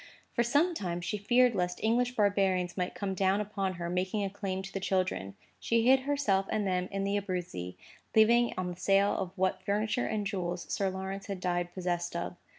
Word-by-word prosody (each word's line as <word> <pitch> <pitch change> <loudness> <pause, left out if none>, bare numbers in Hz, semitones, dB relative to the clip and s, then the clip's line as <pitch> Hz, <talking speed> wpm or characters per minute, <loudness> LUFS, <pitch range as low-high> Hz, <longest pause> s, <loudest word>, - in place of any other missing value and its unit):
For 240 - +2
some 290 +9 +3
time, 175 - -3
she 175 +4 -3
feared 240 +4 +4
lest 180 -2 -1
English 245 +3 +2
barbarians 195 -4 +2
might 180 -1 -2
come 200 -2 -2
down 190 +1 +2
upon 200 -2 -2
her, 170 0 -4
making 185 +4 -1
a 195 - -2
claim 190 -1 -3
to 195 - -9
the 195 - -2
children. 185 - -1 0.2
She 230 0 +1
hid 265 +1 +7
herself 260 -9 +1
and 210 -1 0
them 185 -1 0
in 195 0 -2
the 200 +1 +1
Abruzzi, 175 - -4 0.4
living 235 +2 +5
upon 180 -1 -3
the 175 - -8
sale 195 +1 +3
of 190 - -2
what 185 0 +1
furniture 215 +5 0
and 210 -1 -1
jewels 180 -3 -3
Sir 195 -1 +1
Lawrence 190 +1 -5
had 195 -2 -4
died 175 -1 -1
possessed 175 -2 -2
of. 170 +1 -3
195 Hz, 200 wpm, -30 LUFS, 180-210 Hz, 0.4 s, hid